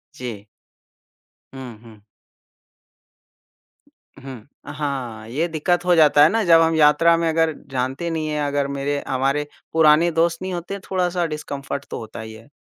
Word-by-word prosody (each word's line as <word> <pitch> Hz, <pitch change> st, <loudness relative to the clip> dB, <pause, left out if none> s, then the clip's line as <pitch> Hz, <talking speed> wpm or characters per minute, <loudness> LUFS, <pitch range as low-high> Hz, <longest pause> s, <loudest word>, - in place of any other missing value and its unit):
जी। 115 Hz, -5 st, -7 dB, 1.1 s
हुँ, 130 Hz, -4 st, -9 dB
हुँ। 110 Hz, -3 st, -16 dB, 2.2 s
हुँ, 130 Hz, -4 st, -10 dB, 0.3 s
हाँ, 130 Hz, -7 st, -5 dB
ये 155 Hz, +8 st, -1 dB
दिक्कत 175 Hz, +2 st, -1 dB
हो 180 Hz, -1 st, +4 dB
जाता 150 Hz, -2 st, +6 dB
है 155 Hz, -, +6 dB
ना 225 Hz, 0 st, 0 dB
जब 165 Hz, -1 st, +6 dB
हम 165 Hz, 0 st, +2 dB
यात्रा 160 Hz, +2 st, +5 dB
में 165 Hz, -, 0 dB
अगर 160 Hz, 0 st, +1 dB, 0.2 s
जानते 135 Hz, +6 st, -2 dB
नहीं 160 Hz, -1 st, -3 dB
है 150 Hz, -, -2 dB
अगर 140 Hz, -1 st, -1 dB
मेरे 140 Hz, +1 st, -3 dB
हमारे 135 Hz, +3 st, 0 dB, 0.3 s
पुराने 160 Hz, +1 st, +4 dB
दोस्त 165 Hz, +1 st, 0 dB
नहीं 185 Hz, 0 st, -4 dB
होते, 175 Hz, +3 st, -5 dB
थोड़ा-सा 180 Hz, -2 st, -1 dB
डिसकम्फर्ट 140 Hz, -3 st, -5 dB
तो -, -, -4 dB
होता 110 Hz, 0 st, -9 dB
ही 110 Hz, 0 st, -8 dB
है। 110 Hz, +3 st, -14 dB
150 Hz, 150 wpm, -21 LUFS, 135-165 Hz, 2.2 s, जाता